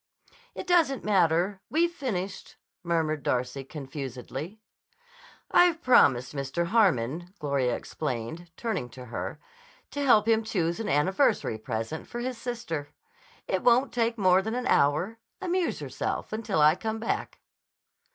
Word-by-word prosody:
"It - - -5
doesn't 335 -7 +3
matter. 185 -1 +2
We'd 335 +3 +2
finished," 205 - -4 0.3
murmured 160 -3 0
Darcy 125 +1 -1
confusedly. 135 - -7 0.9
"I've 345 -2 +4
promised 130 - +4
Mr. 140 +5 -2
Harmon," 175 - +1
Gloria 140 -6 0
explained, 150 +4 -5
turning 220 - -2
to 125 - -8
her, 120 - -5 0.5
"to 285 - -2
help 225 -5 +5
him 225 0 +3
choose 175 -5 -1
an 225 - -3
anniversary 185 - +2
present 115 +6 -4
for 240 - -6
his 250 -1 -4
sister. 230 - -4 0.6
It - - 0
won't 250 +2 +4
take 230 -1 +1
more 185 -2 +4
than 220 +4 -3
an 250 0 -2
hour. 170 - +2 0.2
Amuse 370 -2 -1
yourself - - -3
until 215 -7 -1
I 150 +1 +7
come 220 +5 -3
back." 225 - -3
180 Hz, 130 wpm, -28 LUFS, 145-235 Hz, 0.9 s, I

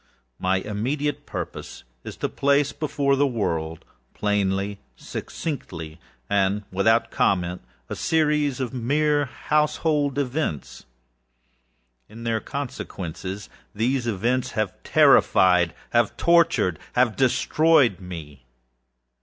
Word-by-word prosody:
My 95 +1 +1
immediate 125 +10 -2
purpose - - -6 0.2
is - - -8
to - - -1
place 140 0 +2
before 140 -2 0
the 140 +1 +3
world, 80 - -2 0.3
plainly, 100 -1 0 0.2
succinctly, 80 - -6 0.3
and 100 +1 +1
without 110 +5 +2
comment, 90 -1 0 0.3
a - - -5
series 150 -4 +1
of 130 -1 -3
mere 145 +4 +1
household 150 +1 0
events. 135 - -3 1.2
In 115 +2 -10
their 115 -1 0
consequences, 100 - -6 0.3
these 120 +3 0
events 120 +4 0
have 110 -4 -1
terrifiedâhave 90 -2 +5 0.5
torturedâhave 125 - +2
destroyed 135 - +3
me. 80 -8 -9
115 Hz, 95 wpm, -24 LUFS, 95-145 Hz, 1.2 s, terrifiedâhave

